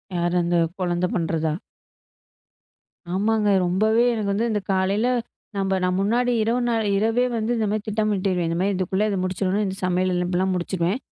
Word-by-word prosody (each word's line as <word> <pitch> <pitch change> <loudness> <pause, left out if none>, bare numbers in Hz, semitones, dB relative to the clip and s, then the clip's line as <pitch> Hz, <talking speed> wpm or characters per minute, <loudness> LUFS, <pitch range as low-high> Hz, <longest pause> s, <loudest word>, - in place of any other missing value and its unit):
யாரு 175 0 0
அந்த 170 0 +1 0.2
குழந்தை 180 0 0
பண்றதா? 160 -2 0 1.6
ஆமாங்க. 210 +2 +1 0.2
ரொம்பவே 215 +6 +2
எனக்கு 210 -3 -1
வந்து 230 +4 0
இந்தக் 205 -2 -3
காலையில 195 +5 +1 0.5
நம்ப 195 0 0
நம்ம 180 0 +1
முன்னாடி 240 +5 +1
இரவு 235 +3 +1 0.4
இரவே 225 +4 +2
வந்து 220 +2 -1
இந்த 220 - 0
மாதிரி 215 -1 -1
திட்டமிட்டுருவேன் 200 -5 0
இந்த 170 - -1
மாரி 200 +2 +1
இதுக்குள்ள 190 +3 0
முடிச்சுடுனும் 190 +2 0
இந்த 190 -1 -3
சமையல் 185 +1 +1
எல்லாம் 185 +1 0
முடிச்சிருவேன். 180 +4 -1
195 Hz, 145 wpm, -23 LUFS, 180-215 Hz, 1.6 s, ரொம்பவே